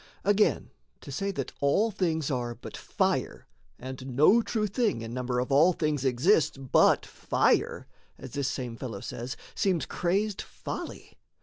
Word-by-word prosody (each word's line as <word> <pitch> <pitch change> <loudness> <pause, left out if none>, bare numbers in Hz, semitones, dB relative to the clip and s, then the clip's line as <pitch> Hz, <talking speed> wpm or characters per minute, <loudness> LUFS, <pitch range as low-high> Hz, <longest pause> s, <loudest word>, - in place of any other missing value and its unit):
Again, 205 +1 +2 0.3
to - - -9
say 195 +9 -2
that 135 -7 -4
all 200 +11 +2
things 160 -7 -1
are 120 -2 -2
but - - -10
fire - - -1 0.3
And 130 0 -7
no 175 - +6
true 220 -1 -1
thing 210 - 0
in 115 +1 -6
number 125 0 -2
of 125 +2 -1
all 160 +7 +5
things 150 -5 -1
Exists 145 - +3
but 135 -1 +3
fire, - - +1 0.3
as 130 - -10
this 140 0 -1
same 125 -3 -4
fellow 115 -5 -6
says, 120 +4 -6 0.2
Seems 185 -6 +1
crazed 195 +3 -1
folly. - - -8
145 Hz, 150 wpm, -28 LUFS, 125-190 Hz, 0.3 s, no